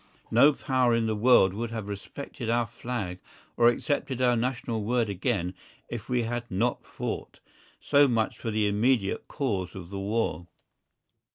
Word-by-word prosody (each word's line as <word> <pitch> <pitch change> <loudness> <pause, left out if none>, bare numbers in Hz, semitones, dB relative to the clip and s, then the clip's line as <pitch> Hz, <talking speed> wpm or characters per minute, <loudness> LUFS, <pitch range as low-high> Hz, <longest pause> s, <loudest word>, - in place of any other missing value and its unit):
No 140 +6 +6
Power 130 -3 +2
in 115 -1 +1
the 110 -1 0
world 105 -4 +5
would 115 +3 -3
have 110 -3 -5
respected 110 +4 -6
our 120 0 +2
Flag 115 -5 -5 0.4
or 120 - +5
accepted 130 +1 0
our 125 -1 +3
national 120 -2 -2
word 115 0 +1
again 95 -2 -1 0.4
if 115 -2 -6
we 125 -1 +1
had 120 +1 -3
not 115 +6 0
fought. - - -5 0.4
So 145 0 +4
much 115 -3 0
for 115 - -3
the 110 -1 +1
immediate 105 0 +1
cause 105 - -2
of 90 -1 -9
the 100 - -4
war. 95 -5 -1
115 Hz, 160 wpm, -27 LUFS, 105-125 Hz, 0.4 s, No